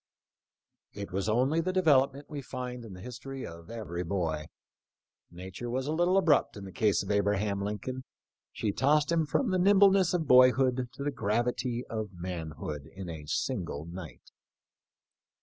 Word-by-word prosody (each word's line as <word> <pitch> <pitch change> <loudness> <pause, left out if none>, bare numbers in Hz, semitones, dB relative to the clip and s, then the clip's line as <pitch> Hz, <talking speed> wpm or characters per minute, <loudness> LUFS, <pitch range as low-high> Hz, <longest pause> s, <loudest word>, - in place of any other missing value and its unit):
* - - -64 0.3
It 100 -1 -7
was 95 +3 -1
only 130 +9 +2
the 185 +3 -1
development 140 -6 +3
we 145 -2 -6
find 125 -1 -6
in 110 -4 -9
the 90 - -10
history 130 +3 -7
of 85 0 -10
every 95 -7 -4
boy. 80 -4 -2 0.8
Nature 95 +7 -7
was 130 +2 -2
a 150 - -2
little 175 +3 +3
abrupt 155 - +3
in 100 - -8
the 95 - -8
case 100 -2 +2
of - - -4
Abraham 100 0 +1
Lincoln; 105 +6 -4 0.5
she 105 - -1
tossed 145 +7 +2
him 165 -2 +2
from 230 - +1
the 185 - +2
nimbleness 195 -1 +5
of 165 -3 0
boyhood 130 0 +5
to 140 - -6
the 145 - 0
gravity 120 +1 -1
of 110 -3 -5
manhood 80 -5 -6
in 95 -2 -8
a 80 -3 -7
single 75 0 -2
night. 85 -7 -10
120 Hz, 165 wpm, -30 LUFS, 95-140 Hz, 0.8 s, nimbleness